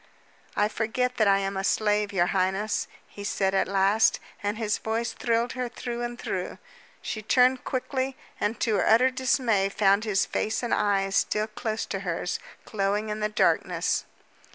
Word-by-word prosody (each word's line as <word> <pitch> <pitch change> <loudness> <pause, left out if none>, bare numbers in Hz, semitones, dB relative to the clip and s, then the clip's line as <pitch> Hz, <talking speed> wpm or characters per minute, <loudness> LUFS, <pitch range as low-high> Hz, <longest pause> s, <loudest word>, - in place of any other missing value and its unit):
"I 205 - +3
forget 245 +4 -1
that 215 - +3
I 195 0 +5
am 195 0 -2
a 190 - -2
slave, 210 0 +1
your 180 -3 +2
highness," 195 +3 0 0.2
he 205 - -10
said 195 -1 0
at 195 - +2
last, 195 +3 +3 0.2
and 205 +1 -2
his 215 -2 -1
voice 225 +1 -2
thrilled 235 +1 0
her 250 -1 -3
through 240 -1 -5
and 240 0 -4
through. - - -4 0.5
She 215 - -4
turned 250 +3 +3
quickly 260 0 -2 0.2
and 215 +2 -1
to 215 -3 +2
her - - +1
utter 245 +4 +5
dismay 250 -6 +1
found 200 +1 +3
his 210 -3 +1
face 220 +3 -2
and 240 - 0
eyes 195 -1 +1
still 210 0 +1
close 220 0 -3
to 195 - -4
hers, 180 -1 -2 0.3
glowing 205 +1 -1
in 210 0 -3
the 210 0 0
darkness. 210 - +1
215 Hz, 175 wpm, -26 LUFS, 200-235 Hz, 0.5 s, I